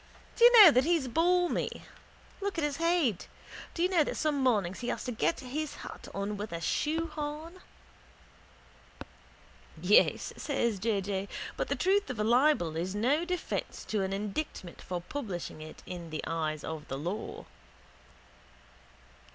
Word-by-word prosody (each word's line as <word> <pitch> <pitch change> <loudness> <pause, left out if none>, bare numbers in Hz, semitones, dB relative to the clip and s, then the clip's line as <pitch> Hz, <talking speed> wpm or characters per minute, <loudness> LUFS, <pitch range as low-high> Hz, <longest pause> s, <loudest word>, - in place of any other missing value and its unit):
Do 470 - +1
you 480 - +10
know 345 - +10
that 255 -1 +4
he's 325 -3 +1
balmy? 350 +6 +1 0.6
Look 400 -2 -2
at 325 - 0
his 295 -1 -1
head. 330 - +1 0.5
Do 335 - 0
you 365 - +3
know 350 -5 +4
that - - -4
some 300 -3 0
mornings 205 -8 +1
he 245 - -5
has - - -2
to 250 - -3
get 245 +7 0
his 290 +4 -4
hat - - -9
on 200 +1 -3
with 210 +2 -5
a 170 - -3
shoehorn. 315 - -2 2.2
—Yes, 185 +6 +3
says 235 -8 -1
J. 205 -1 0
J., 195 0 -3 0.3
but - - -2
the - - 0
truth 390 0 +2
of 250 -4 -4
a - - +2
libel 240 - +3
is 180 +4 -2
no 275 +10 +2
defence 360 -1 -3
to 215 -2 0
an 190 0 -1
indictment 200 - -4
for 180 -1 -4
publishing 180 - -5
it 155 0 -10
in 175 -2 -7
the 155 -1 -4
eyes 155 -2 -2
of 160 -1 -6
the 135 - -4
law. 175 +9 -5
245 Hz, 160 wpm, -30 LUFS, 190-310 Hz, 2.2 s, you